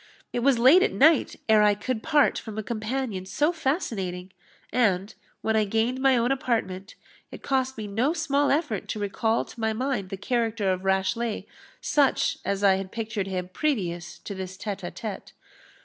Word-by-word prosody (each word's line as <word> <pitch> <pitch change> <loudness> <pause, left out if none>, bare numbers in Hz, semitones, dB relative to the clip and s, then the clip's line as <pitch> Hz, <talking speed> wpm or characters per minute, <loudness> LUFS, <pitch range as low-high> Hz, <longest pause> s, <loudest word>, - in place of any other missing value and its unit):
It - - 0
was 260 +1 +3
late 265 +10 +7
at 415 - +2
night 315 +2 +4
ere 220 -1 +6
I 210 -1 +4
could 220 +2 -3
part 300 -1 +3
from 220 -2 -8
a 220 - -2
companion 220 -1 -3
so 295 - +1
fascinating; 210 - -2 0.4
and, 200 -5 +1 0.3
when 220 - 0
I 215 -1 +3
gained 225 +5 0
my 265 -2 +4
own 240 +2 +1
apartment, 220 -7 -2 0.3
it - - -11
cost 265 -2 0
me 215 - -4
no 225 +8 0
small 290 -4 +1
effort 280 - 0
to 215 - -4
recall 220 +3 0
to - - -13
my 220 0 0
mind 245 -5 -2
the 195 - -5
character 220 -2 0
of 185 +1 -6
Rashleigh, 195 +4 0 0.4
such 285 -3 +2
as 200 0 -2
I 195 -1 +5
had 190 0 -6
pictured 220 -3 -3
him 180 -1 -3
previous 185 - -2
to 200 - -7
this 185 -1 -6
_tete 200 -1 -5
a 175 - -4
tete. 215 -3 -7
220 Hz, 180 wpm, -26 LUFS, 195-260 Hz, 0.4 s, late